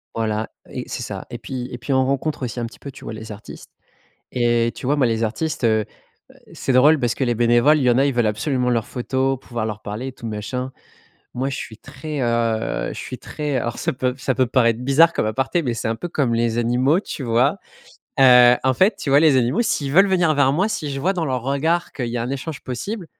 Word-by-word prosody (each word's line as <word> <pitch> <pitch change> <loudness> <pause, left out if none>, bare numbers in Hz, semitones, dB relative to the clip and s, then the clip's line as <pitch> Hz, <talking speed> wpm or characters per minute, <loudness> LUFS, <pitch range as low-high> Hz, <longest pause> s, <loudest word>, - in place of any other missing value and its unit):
Voilà 110 -1 -2 0.2
et - - -5
c'est - - -5
ça, - - -6
et - - -6
puis 125 -2 -5
et - - -5
puis, 130 - -5
on 130 -1 +3
rencontre 140 +2 -2
aussi 120 0 -5
un 120 - -2
petit 115 - -15
peu, 140 - -8
tu 130 - -14
vois, - - -6
les 110 0 -8
artistes 105 +1 -11 0.6
et 120 -1 +1
tu - - -7
vois, 145 +3 +2
moi, 135 -3 +3
les 115 -1 0
artistes, 145 +8 -2
heu, 110 -2 +3 0.7
c'est - - -2
drôle 145 +5 +5
parce 120 -4 0
que - - -5
les 120 -2 +1
bénévoles, 120 +6 +4
il 140 - 0
y 125 - +4
en 120 - +3
a, 135 - +4
ils 140 - +1
veulent 120 -2 +1
absolument 125 +4 0
leurs 115 -3 0
photos, 130 +2 -1
pouvoir 115 -4 -4
leur 105 -1 -6
parler, 110 +6 -5
et - - -7
tout 120 - -10
machin. 125 +5 -4 0.6
Moi, 130 +3 -2
je 135 - -4
suis 110 - -7
très, 135 +4 -6
heu, 115 -2 0
je - - -8
suis 130 - -7
très 145 +3 -4
alors 120 -1 -3
ça - - -1
peut 125 0 -1
ça 135 0 -1
peut 130 +2 +2
paraître 115 -2 +2
bizarre 140 +6 +4
comme - - -1
aparté, 135 +10 0
mais 125 -5 -2
c'est 115 - -3
un 115 - -1
peu 150 +10 -5
comme 140 -8 0
les 115 0 0
animaux, 125 +7 +2
tu 145 - -6
vois? 125 +9 +2 0.6
Heu, 125 -2 +8
en 130 0 +2
fait, 190 - +3
tu - - -5
vois, 140 +1 +5
les 150 -4 +5
animaux, 125 - +1
s'ils 145 -11 -1
veulent 195 +7 +6
venir 175 -5 +2
vers 140 -2 +3
moi, 185 +8 +1
si 155 -9 -3
je 135 0 -4
vois 190 +7 +1
dans 175 -3 -1
leur 130 -4 -1
regard 160 +6 0
qu'il 125 -4 -4
y 120 +1 -3
a - - -1
un 120 - -4
échange 140 +2 -5
possible, 180 - -5
130 Hz, 250 wpm, -21 LUFS, 115-140 Hz, 0.7 s, Heu